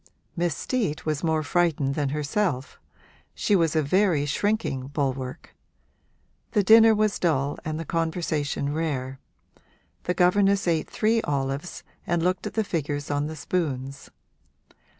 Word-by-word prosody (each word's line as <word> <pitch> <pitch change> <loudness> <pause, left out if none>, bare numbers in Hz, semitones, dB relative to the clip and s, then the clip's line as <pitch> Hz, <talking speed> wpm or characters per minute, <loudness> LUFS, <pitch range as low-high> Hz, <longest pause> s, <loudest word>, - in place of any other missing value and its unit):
Miss 170 -3 -1
Steet 210 - -2
was 155 -1 -1
more 160 -1 +1
frightened 150 -4 +1
than 145 -1 -1
herself 150 0 -2 0.6
she 205 - +2
was 165 -4 +2
a 155 - +3
very 170 -1 +2
shrinking 145 - -1
bulwark. 135 0 -3 1.0
The 210 -4 +3
dinner 225 +2 +7
was 215 -1 +1
dull 145 -5 0
and 155 -1 -3
the 165 - -5
conversation 160 -3 -1
rare; 135 -5 -3 0.9
the 180 - 0
governess 195 +2 +3
ate 165 -2 +1
three 225 +1 +1
olives 140 +2 -3 0.2
and 170 -1 +1
looked 180 +1 0
at - - -8
the 220 - +2
figures 145 -6 -3
on 145 +1 0
the 160 - -6
spoons. 140 -4 -3
160 Hz, 135 wpm, -25 LUFS, 145-185 Hz, 1.0 s, dinner